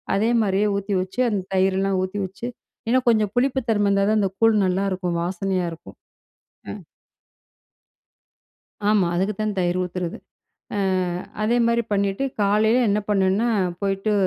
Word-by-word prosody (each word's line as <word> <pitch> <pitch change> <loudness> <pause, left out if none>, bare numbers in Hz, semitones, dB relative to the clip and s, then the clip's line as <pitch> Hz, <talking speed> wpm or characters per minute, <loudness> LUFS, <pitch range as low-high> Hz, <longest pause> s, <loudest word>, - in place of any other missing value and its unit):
அதே 220 +4 +2
மாரியே 200 +1 +1
ஊத்தி 200 +1 -3
வச்சு 190 +5 -7
அந்த 205 -3 -1
தயிரெல்லாம் 190 0 +1
ஊத்தி 190 +2 -4
வச்சு 190 +5 -8 0.4
இன்னும் 255 +2 +2
கொஞ்சம் 215 -3 +3
புளிப்பு 265 +2 +2
தன்மை 205 -2 +2
இருந்தா 200 0 +2
தான் 215 - +3
அந்த 195 -2 +1
கூழ் 225 -1 +4
நல்லாருக்கும். 185 -2 -1
வாசனையா 185 0 -1
இருக்கும். 165 - -12 0.7
ஆ, - - -3 2.2
ஆமா. 210 -3 +3
அதுக்கு 195 +4 0
தான் 215 -1 -1
தயிர் 175 0 0
ஊத்துறது. 180 -1 -4 0.6
அ - - -1 0.7
அதேமாரி 235 +1 +2
பண்ணிட்டு, 200 +5 0 0.2
காலையில 215 +4 +3
என்ன 205 +1 +2
பண்ணேன்னா, 200 +3 +2 0.3
போயிட்டு 195 +2 0
200 Hz, 135 wpm, -23 LUFS, 190-215 Hz, 2.2 s, கூழ்